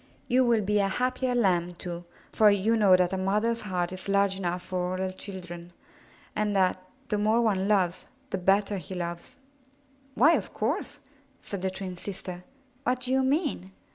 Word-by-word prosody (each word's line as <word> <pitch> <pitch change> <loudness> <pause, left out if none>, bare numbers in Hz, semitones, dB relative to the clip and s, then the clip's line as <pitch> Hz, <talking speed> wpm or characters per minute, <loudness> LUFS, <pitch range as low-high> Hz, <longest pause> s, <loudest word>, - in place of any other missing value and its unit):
You 255 +2 +4
will 235 -3 +3
be 210 +1 +1
a 200 - +2
happier 255 +4 0
Lamb, 180 -6 +2
too, 175 0 -7 0.3
for 215 -1 +5
you 205 +3 +2
know 200 -4 +6
that 180 0 +2
a 190 - -1
mother's 210 +5 +1
heart 180 -3 -2
is 185 +1 -7
large 200 -1 +2
enough 180 -1 -2
for 180 0 -2
all - - -2
her 190 0 -2
children, 175 -3 -8 0.6
and 210 -1 0
that 185 -1 +2 0.3
the 210 - 0
more 215 +2 +3
one 200 -5 +1
loves, 185 -4 +1 0.2
the 190 - -1
better 200 +2 +2
he 185 0 -7
loves." 170 +4 -5 0.8
'*Why, 305 +6 +6
of - - -2
course, - - -2 0.4
said 200 -2 -5
the 190 - 0
twin 185 -1 -6
sister. 180 -1 -7 0.4
''What 255 -1 0
do 255 - -3
you 265 0 +3
mean? 265 - 0
195 Hz, 180 wpm, -28 LUFS, 180-215 Hz, 0.8 s, know